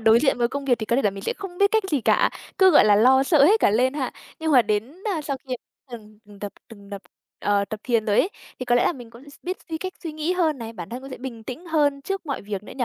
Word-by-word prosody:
đối 225 +1 +5
diện 270 -3 +2
với 235 -1 +2
công 280 +1 -5
việc 250 -3 +2
thì 220 - -4
có 235 - +1
thể 275 - +2
là 205 - +2
mình 195 0 -9
sẽ - - -1
không 365 -3 -9
biết 400 0 +4
cách 440 -1 +2
gì 290 -4 +1
cả, - - +3 0.3
cứ, 380 -1 +7
gọi 295 - +6
là, 210 -1 +5
lo 260 +5 +5
sợ 280 0 +4
hết 425 +8 +5
cả - - +4
lên 255 +5 +2
ha? 275 -4 -3 0.3
Nhưng 320 -1 0
mà 250 -4 +7
đến, 215 +6 -2 0.2
a, 315 - -3
sau 280 -2 -3
khi 255 - -2 0.3
từng 215 -3 -11
từng 205 -1 -16
tập 205 0 -6 0.2
từng 200 -3 -14
đập 200 -1 -7 0.4
ờ, 205 -1 +1
tập 215 +1 -7
thiền 230 -3 +1
rồi 210 -1 +2
ấy, - - +3 0.3
thì 255 - -4
có 245 -1 +2
lẽ 245 - +3
là - - +2
mình 245 -7 -11
cũng 255 +5 -14
s - - -15
biết 365 +1 -3
suy 320 -1 -3
cách 370 +2 -5
suy 325 -3 -5
nghĩ 310 +3 -1
hơn 325 -6 +1
này, 230 -1 -7
bản 175 -7 -8
thân 245 +2 -6
cũng 270 - -10
sẽ - - -7
bình 240 -3 -7
tĩnh 260 +10 -8
hơn 290 -4 +1
trước 390 +2 -4
mọi 275 - -3
việc 200 -1 -5
nữa - - -11
nhỉ? 255 - 0
255 Hz, 315 wpm, -23 LUFS, 220-310 Hz, 0.4 s, cứ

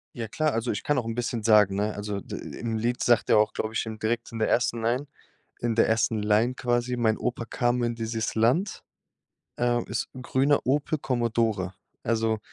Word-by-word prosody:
Ja 115 -2 -4
klar, 155 +7 0
also 115 +2 -1
ich 100 - -2
kann 145 -2 +1
auch 120 - -1
'n 115 0 -3
bisschen 120 -2 -2
sagen, 105 -3 +5
ne? 105 +1 0
Also 100 -1 -4
d - - -7 0.2
im 115 -2 -2
Lied 120 +2 -1
sagt 120 -2 +3
er - - +6
auch, 105 0 +3
glaube 110 0 -3
ich, - - 0
im 110 -1 -6
direkt 115 +2 -2
in 115 - -5
der 110 - +1
1. 120 -1 +1
Line 125 +5 0 0.6
in 120 -1 0
der 115 - +4
ersten 110 -1 +1
Line, 110 +4 +2
quasi: 120 0 0
„Mein 110 -2 +2
Opa 120 -1 -3
kam 120 +1 0
in 120 0 0
dieses 115 -1 -3
Land, 125 - +1 0.8
äh 120 0 +2
ist - - -2
'n 130 - -8
grüner 135 +3 +2
Opel 145 +3 +1
Commodore.“ 115 -7 0 0.3
Also, 110 -1 +1
115 Hz, 205 wpm, -26 LUFS, 110-120 Hz, 0.8 s, er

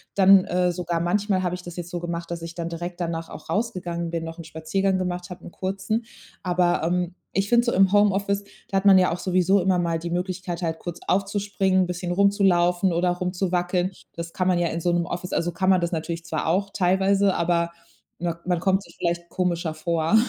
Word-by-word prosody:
dann 195 -1 +7
äh, 180 0 +1
sogar 170 -1 -2
manchmal 190 +2 +1
habe 180 - -1
ich 180 - -5
das 175 -1 -9
jetzt 175 -1 -6
so 175 - -3
gemacht, 170 0 -5
dass 170 -1 -4
ich 165 0 -7
dann 170 -1 -3
direkt 175 +1 -6
danach 165 -1 -3
auch 155 - -11
rausgegangen 175 -5 -2
bin, 165 -1 -3
noch 165 +1 -7
'n 165 - -6
Spaziergang 185 +5 -1
gemacht 180 -1 -3
habe, 180 - -9
'n - - -9
kurzen. 195 +5 -2 0.4
Aber, 175 -2 +1
ähm, 175 +1 0 0.2
ich 195 +1 0
finde 240 0 +5
so 240 - +2
im 195 -1 +4
Homeoffice, 200 -1 +2 0.3
da 195 - +1
hat 195 - 0
man 195 -1 +8
ja 180 - +4
auch 175 - -5
sowieso 185 +1 +2
immer 185 0 +2
mal 170 -2 0
die 170 - -5
Möglichkeit 180 0 -3
halt 160 -1 -2
kurz 175 -1 -7
aufzuspringen, 195 -1 +1
bisschen 175 0 -4
rumzulaufen 185 -2 +3
oder 175 +1 +2
rumzuwackeln. 180 0 -1 0.2
Das 170 0 -6
kann 185 0 0
man 180 - +3
ja 175 -1 +1
in 165 - -3
so 175 - +1
'nem 170 -1 +1
Office, 180 +1 -5
also 175 +1 0
kann 185 +3 0
man 185 -2 +5
das 170 - -1
natürlich 165 +1 -3
zwar 160 -1 -2
auch 195 +4 +1
teilweise, 195 +1 +2
aber 170 0 +1 0.5
mak 170 -1 -4
man 180 -2 +1
kommt 190 +3 +2
sich - - -16
vielleicht 170 0 -2
komischer 175 -3 -1
vor. 165 +5 +2
180 Hz, 215 wpm, -24 LUFS, 170-190 Hz, 0.5 s, man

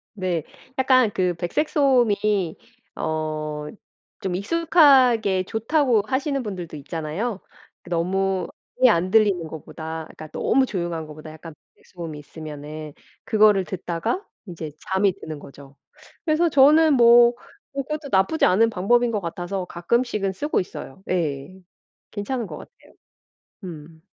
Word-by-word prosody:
네. 180 -5 -2 0.3
약간 255 -3 +4
그 180 -1 +1
백색 175 - -1
소음이 215 - +2 0.4
어 155 -1 -3 0.5
좀 185 -3 -2
익숙하게 255 - +4
좋다고 225 - +1
하시는 275 +2 -1
분들도 180 -7 -6
있잖아요. 165 - -4 0.4
그 - - -13
너무 185 +2 0 0.3
아예 255 - +8
안 185 -3 +1
들리는 195 -7 +3
것보다 160 +1 -7
그러니까 155 - -9
너무 265 - +2
조용한 175 -7 -4
것보다 155 +1 -10
약간 160 0 -11 0.2
백색 - - -26
소음이 165 -4 -7
있으면은 150 0 -8 0.3
그거를 210 -3 +4
듣다가 175 - -3 0.2
이제 160 -4 -7 0.2
잠이 190 +1 +2
드는 155 -4 -7
거죠. 140 0 -14 0.5
그래서 320 +1 +2
저는 300 +1 +6
뭐 240 -1 +7 0.4
그것도 290 +2 -4
나쁘지 195 +12 +3
않은 225 +5 +4
방법인 235 +4 +2
것 215 - 0
같아서 180 +1 -4
가끔씩은 195 +3 -1
쓰고 290 +8 -1
있어요. 180 -2 -9
예. 160 -3 -2 0.6
괜찮은 225 +2 -3
거 - - -7
같아요. - - -17 0.7
음. 160 -1 -10
190 Hz, 290 characters per minute, -23 LUFS, 160-240 Hz, 0.7 s, 아예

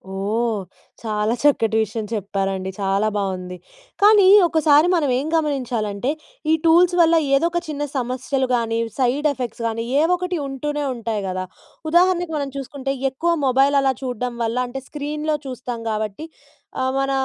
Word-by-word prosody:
ఓహ్! 215 +3 -1 0.4
చాలా 215 0 0
చక్కటి 225 -6 +3
విషయం 215 +1 -5
చెప్పారండి. 195 -2 -2
చాలా 195 +2 +1
బావుంది. 185 -2 -3 0.4
కానీ 410 -2 +7 0.2
ఒకసారి 310 0 +4
మనం 305 -5 +1
ఏం 285 - -3
గమనించాలంటే 250 -6 -1 0.4
ఈ - - +5
టూల్స్ 345 +2 +5
వల్ల 335 0 +5 0.2
ఏదో 325 +5 +3
ఒక 345 - 0
చిన్న 295 -1 -3
సమస్యలు 260 +1 -1
గానీ 230 -1 -1 0.2
సైడ్ 265 +4 +2
ఎఫెక్ట్స్ 245 -3 -5
గాని 230 0 -3 0.2
ఏవొకటి 360 +2 0
ఉంటూనే 295 +2 -3
ఉంటాయి 225 -3 -3
కదా! 185 0 -3 0.5
ఉదాహరణకు 355 -1 +3
మనం 280 -1 -3
చూసుకుంటే 275 0 -4 0.2
ఎక్కువ 335 +6 0
మొబైల్ 270 +2 +3
అలా 265 -1 +2
చూడ్డం 250 -1 -3
వల్ల 230 +2 -1
అంటే 265 +2 -6
స్క్రీన్‌లో 300 +1 -3
చూస్తాం 250 -2 -5
కాబట్టి 215 +6 -3 0.5
ఆహ్, 260 0 +1
మన 270 0 0
260 Hz, 145 wpm, -21 LUFS, 220-300 Hz, 0.5 s, కానీ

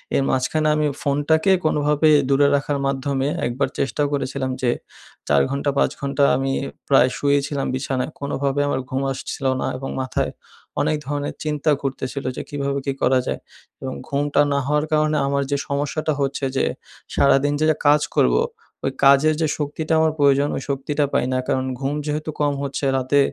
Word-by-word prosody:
এর 135 - +3
মাঝখানে 130 +4 +1
আমি 150 -1 +1
ফোনটাকে 150 +6 +2
কোনোভাবে 150 0 +3 0.2
দূরে 140 +1 +4
রাখার 145 0 -1
মাধ্যমে 135 0 -1 0.2
একবার 125 +3 -1
চেষ্টাও 135 +3 0
করেছিলাম 135 -1 -2
যে, 125 -2 +2 0.6
৪ 70 -1 +4
ঘন্টা, 140 +1 -1
৫ - - +3
ঘন্টা 140 +1 0
আমি 135 0 -1 0.4
প্রায় 130 -2 +5
শুয়েইছিলাম 140 0 0
বিছানায়। 130 +1 -2
কোনোভাবে 140 0 -1
আমার 130 - 0
ঘুম 130 +1 -1
আসছিলো 135 0 -2
না। - - -1
এবং 135 +1 -5
মাথায় 130 - -1 0.5
অনেক 155 - +1
ধরনের 145 0 -3
চিন্তা 150 0 0
ঘুরতেছিলো। 135 0 -3
যে - - -2
কীভাবে 140 -1 -2
কি 140 - 0
করা 130 +1 +4
যায়? - - -2 0.4
এবং 130 -1 -4 0.2
ঘুমটা 145 +1 +2
না 140 - +2
হওয়ার 150 +1 +1
কারণে 155 0 +2
আমার 140 0 +1
যে 140 - +2
সমস্যাটা 145 +2 -1
হচ্ছে 140 0 -1
যে, - - +2 0.5
সারাদিন 140 +1 +4
যে - - +4 0.2
কাজ 150 +1 +6
করবো, - - +4 0.4
ওই 135 - +1
কাজের 140 +3 +6
যে 160 - +2
শক্তিটা 155 +2 -2
আমার 160 0 +3
প্রয়োজন 140 0 +4
ওই - - -4
শক্তিটা 145 +2 0
পাই - - +2
না। 130 - +1
কারণ 130 0 0
ঘুম 140 +1 -1
যেহেতু 155 +1 -3
কম 145 -1 +2
হচ্ছে, 140 0 -3
রাতে 130 +2 +2
140 Hz, 170 wpm, -22 LUFS, 135-145 Hz, 0.6 s, কাজ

